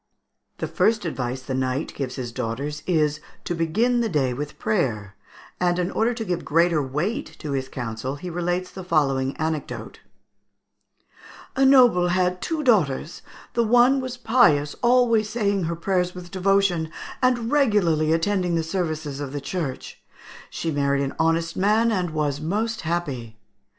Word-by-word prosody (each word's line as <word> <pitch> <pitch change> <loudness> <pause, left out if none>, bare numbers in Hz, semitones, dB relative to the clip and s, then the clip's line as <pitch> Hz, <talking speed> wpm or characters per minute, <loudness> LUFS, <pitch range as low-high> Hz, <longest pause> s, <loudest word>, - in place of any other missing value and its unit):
] - - -52
The - - -3
first 220 -3 +1
advice 130 -4 -3
the 130 - -4
knight 130 +3 -1
gives 130 -2 -4
his 125 -3 -5
daughters 135 +5 -4
is, 155 -4 +1 0.2
to - - -2
begin 220 +10 +1
the 230 - 0
day 135 -7 +1
with 145 +4 -6
prayer; 115 - -1 0.4
and, 175 -1 +2
in 180 +1 -1
order 225 +2 +1
to 225 -1 -4
give 180 -3 -2
greater 165 0 +2
weight 150 - -3
to 150 - -6
his 135 -1 -2
counsel, 120 +2 -4
he 160 +5 -8
relates 175 +1 -2
the 190 - -8
following 135 -6 +1
anecdote: 160 -2 -4 1.6
"A 270 - +2
noble 245 -10 +6
had 180 0 +1
two 320 -2 -2
daughters; 170 - +1 0.3
the 235 - +2
one 245 +4 +4
was 255 -1 -5
pious, 220 - +3
always 240 -3 +3
saying 200 -6 0
her 170 +1 -2
prayers 180 +1 -1
with 175 -1 -9
devotion, 190 -4 +2 0.3
and 245 -2 +1
regularly 200 - +3
attending 175 +1 +1
the 165 - +1
services 160 -4 -3
of 140 -2 -5
the 145 - -2
church; 140 -2 -5 0.5
she 165 - -3
married 140 -1 +1
an 135 - -3
honest 165 0 +1
man, 215 +4 +3
and 180 -5 0
was 150 -2 -1
most 215 +7 -1
happy. 140 -10 -3
170 Hz, 160 wpm, -24 LUFS, 145-205 Hz, 1.6 s, noble